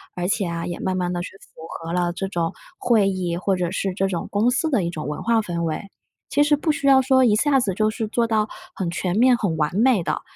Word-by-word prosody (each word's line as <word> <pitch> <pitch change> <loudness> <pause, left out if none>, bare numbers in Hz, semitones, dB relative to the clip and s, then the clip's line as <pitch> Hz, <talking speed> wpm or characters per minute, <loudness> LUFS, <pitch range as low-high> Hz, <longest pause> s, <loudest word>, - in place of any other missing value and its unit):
而 180 0 -2
且 200 -2 0
啊， 170 0 -4
也 175 -1 -5
慢 190 -1 -1
慢 180 -1 -1
地 175 - -2
去 - - -7
符 - - -17
合 165 0 -6
了 175 -1 0
这 195 +2 -3
种 170 -3 -2 0.2
会 220 -5 +3
议， 180 -3 -2
或 190 +1 0
者 175 -1 -1
是 195 0 -2
这 195 +1 0
种 180 -3 -3
公 210 +4 +2
司 270 +6 0
的 255 -10 +1
一 - - -1
种 155 -4 -5
文 150 - -5
化 230 -1 +2
氛 175 -5 -3
围。 165 +5 -3 0.4
其 285 - +2
实 295 0 +3
不 310 +2 0
需 285 -2 -2
要 270 -1 +7
说 260 0 +4
一 215 -3 +4
下 275 +4 +3
子 205 -6 -1
就 215 +3 +1
是 220 0 -3
做 235 +2 0
到 215 -1 +1 0.3
很 185 -3 -3
全 180 +2 -2
面、 250 +2 +5
很 185 -8 -1
完 150 +2 -1
美 230 -1 +3
的， - - -2
195 Hz, 285 characters per minute, -22 LUFS, 175-235 Hz, 0.4 s, 要